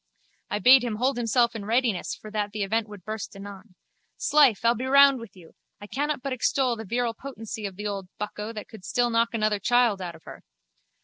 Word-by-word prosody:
I 205 - -1
bade 255 +4 +7
him 235 -3 -2
hold 255 +4 0
himself 235 0 +2
in 215 - -5
readiness 230 -3 0
for 215 - -12
that 210 -1 -2
the 210 -1 -2
event 220 +3 -1
would 205 -4 -12
burst 215 -1 -6
anon. 200 0 -11 0.4
'Slife, 280 -7 +3
I'll 235 - +5
be 250 +3 -4
round 280 0 +6
with 230 -4 -11
you. 170 -3 -16 0.3
I 205 - -9
cannot 285 +4 -2
but 275 -1 -2
extol 255 0 +1
the 220 0 -8
virile 235 +3 -1
potency 225 -4 -7
of 190 - -10
the 210 +2 -7
old 200 -2 -4
bucko 210 +1 -5
that 215 -2 -8
could 220 -4 -13
still 240 +6 0
knock 230 0 +1
another 215 -2 +1
child 235 -2 +2
out 175 -2 -6
of - - -17
her. - - -12
225 Hz, 215 wpm, -26 LUFS, 205-245 Hz, 0.4 s, bade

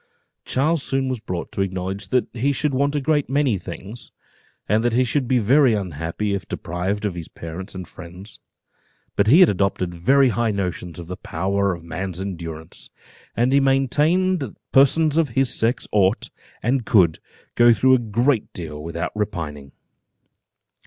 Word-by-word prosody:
Charles 155 +4 +1
soon 135 0 -1
was 130 -2 -2
brought 90 -4 -5
to - - -3
acknowledge 95 +1 -3
that 125 +4 +1
he 125 +4 0
should 150 +1 -1
want 140 +2 +1
a - - +2
great 145 0 +1
many 135 -7 +1
things, 95 +6 -9 0.6
and 110 +2 +2
that 120 -1 +1
he 125 +2 +3
should 130 +1 -1
be 130 0 +2
very 125 +2 +4
unhappy 90 +2 -3
if 100 - -4
deprived 95 +5 -3
of 100 - -1
his 85 -2 -7
parents 85 +4 -8
and 90 -2 -7
friends; 90 +4 -12 0.8
but 100 - +2
he 155 - +7
had 180 - +7
adopted 95 -2 -1
very 130 +11 +3
high 120 0 0
notions 90 -4 -3
of 85 - -7
the 90 +2 -7
power 100 +4 -1
of 85 - -13
man's 90 +2 -5
endurance, 85 -4 -7 0.5
and 125 +3 +2
he 140 - +6
maintained 150 +7 +2
that 135 - -6
persons 150 +3 +4
of 160 -4 +1
his 135 -1 +3
sex 115 +3 +1
ought, 100 0 +1 0.3
and 125 +2 +1
could, 95 -8 +3 0.3
go 120 0 +6
through 130 +3 +4
a 130 - +5
great 120 +2 0
deal 75 -4 -7
without 85 +1 -4
repining. 80 -10 -4
105 Hz, 170 wpm, -22 LUFS, 90-130 Hz, 0.8 s, he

